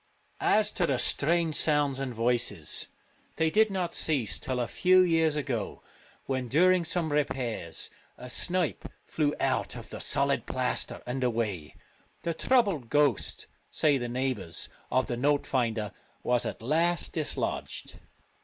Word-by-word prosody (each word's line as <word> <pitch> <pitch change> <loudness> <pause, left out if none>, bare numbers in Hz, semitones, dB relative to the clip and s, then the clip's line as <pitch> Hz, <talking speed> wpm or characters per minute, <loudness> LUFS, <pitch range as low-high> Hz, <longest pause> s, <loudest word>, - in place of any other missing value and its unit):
As 210 0 +4
to 175 -4 0
the 135 - +1
strange 165 +5 +1
sounds 145 -3 +2
and 135 -2 -3
voices, 115 -8 0 0.5
they 160 0 +1
did 220 +3 +4
not 185 -3 -2
cease 135 -10 0
till 130 -1 -3
a 120 - 0
few 185 +8 +4
years 165 -3 +3
ago, 125 -8 -3 0.4
when, 130 -2 -2
during 180 +7 +4
some 165 -1 0
repairs, 125 - -2 0.3
a 125 - -9
snipe 175 +6 -1 0.2
flew 150 -2 0
out - - 0
of - - -10
the - - -6
solid - - +2
plaster - - -1
and 130 +2 -3
away; 110 -10 -2 0.5
the 170 - -1
troubled 195 - +1
ghost, 145 -6 +1 0.2
say 145 -3 +2
the 120 -1 -3
neighbours, 125 -9 -2 0.2
of 130 0 +2
the 120 - -3
note 145 +3 +2
finder 115 -5 -1 0.3
was 125 -1 +2
at - - -6
last 165 +6 +1
dislodged. 155 -3 -3
140 Hz, 145 wpm, -28 LUFS, 120-165 Hz, 0.5 s, As